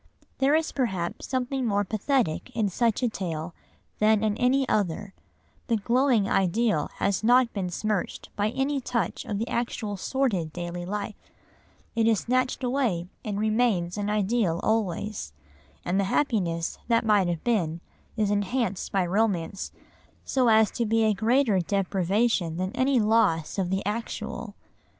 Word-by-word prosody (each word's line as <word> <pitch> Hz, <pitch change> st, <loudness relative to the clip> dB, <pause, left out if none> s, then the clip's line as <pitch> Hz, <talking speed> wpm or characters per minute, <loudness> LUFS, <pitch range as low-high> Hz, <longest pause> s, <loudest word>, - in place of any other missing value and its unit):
There 275 Hz, +2 st, +4 dB
is 320 Hz, 0 st, +1 dB
perhaps 190 Hz, -10 st, -2 dB
something 260 Hz, +1 st, -1 dB
more 205 Hz, -3 st, +1 dB
pathetic 215 Hz, -, 0 dB
in 215 Hz, -3 st, +1 dB
such 230 Hz, +5 st, 0 dB
a -, -, +4 dB
tale 170 Hz, -6 st, -4 dB, 0.5 s
than 215 Hz, 0 st, +4 dB
in 215 Hz, -1 st, +1 dB
any 260 Hz, +2 st, +2 dB
other, 200 Hz, 0 st, -1 dB, 0.5 s
the 235 Hz, -, +2 dB
glowing 235 Hz, 0 st, +2 dB
ideal 195 Hz, -2 st, +1 dB
has 200 Hz, +1 st, 0 dB
not 245 Hz, +1 st, +4 dB
been 190 Hz, -3 st, -2 dB
smirched 210 Hz, +2 st, -2 dB
by 205 Hz, +1 st, +1 dB
any 270 Hz, +3 st, -1 dB
touch 235 Hz, -1 st, -2 dB
of 205 Hz, -, -3 dB
the 225 Hz, +3 st, -2 dB
actual 225 Hz, -4 st, -2 dB
sordid 195 Hz, -, -1 dB
daily 175 Hz, +1 st, -5 dB
life, 205 Hz, +1 st, -5 dB, 0.6 s
it 225 Hz, -1 st, +2 dB
is 220 Hz, -3 st, +3 dB
snatched 255 Hz, +2 st, 0 dB
away 245 Hz, -10 st, 0 dB
and 205 Hz, -2 st, -3 dB
remains 215 Hz, -5 st, +1 dB
an 205 Hz, 0 st, -2 dB
ideal 210 Hz, -4 st, +1 dB
always, 210 Hz, -, -1 dB, 0.5 s
and 185 Hz, +3 st, +1 dB
the 200 Hz, -, +2 dB
happiness 185 Hz, -, 0 dB
that 230 Hz, -1 st, +2 dB
might 205 Hz, -4 st, +4 dB
have 170 Hz, -2 st, -2 dB
been 175 Hz, -9 st, 0 dB, 0.4 s
is 210 Hz, -2 st, +1 dB
enhanced 205 Hz, 0 st, -1 dB
by 190 Hz, -2 st, +1 dB
romance 195 Hz, -1 st, -1 dB, 0.5 s
so 255 Hz, -2 st, +2 dB
as 220 Hz, -1 st, +5 dB
to 235 Hz, -, -1 dB
be 225 Hz, +1 st, +2 dB
a 215 Hz, -1 st, +3 dB
greater 225 Hz, +1 st, +2 dB
deprivation 195 Hz, -1 st, 0 dB
than 185 Hz, +1 st, -2 dB
any 260 Hz, +1 st, +2 dB
loss 210 Hz, -7 st, +2 dB
of 185 Hz, -2 st, 0 dB
the 190 Hz, 0 st, -1 dB
actual. 220 Hz, 0 st, -4 dB
210 Hz, 150 wpm, -26 LUFS, 185-235 Hz, 0.6 s, as